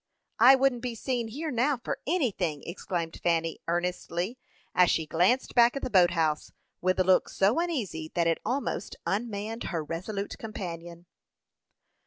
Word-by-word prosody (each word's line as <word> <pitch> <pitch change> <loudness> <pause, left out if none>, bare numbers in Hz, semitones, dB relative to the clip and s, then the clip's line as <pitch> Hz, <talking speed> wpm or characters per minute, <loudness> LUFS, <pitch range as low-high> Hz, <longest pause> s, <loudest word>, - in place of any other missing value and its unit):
"I 260 +3 +9
wouldn't 265 -2 +2
be 245 -1 -3
seen 240 0 -2
here 300 +8 -4
now 260 +3 +2
for 240 - -4
anything!" 200 - 0
exclaimed 170 -1 -4
Fanny, 165 -1 0
earnestly, 175 +5 -2 0.3
as 180 -2 +5
she 160 - +1
glanced 180 - +2
back 240 +1 +5
at 275 - -4
the - - -3
boat 180 -3 +6
house, 160 -3 0 0.3
with 185 +1 +1
a - - +5
look 185 0 +3
so 200 +9 +2
uneasy 225 - -2
that 170 -1 +2
it 165 -1 +2
almost 255 +6 -2
unmanned 215 +1 -3
her 165 -4 -2
resolute 195 +6 -5
companion. 175 -5 -7
195 Hz, 155 wpm, -28 LUFS, 170-245 Hz, 0.3 s, I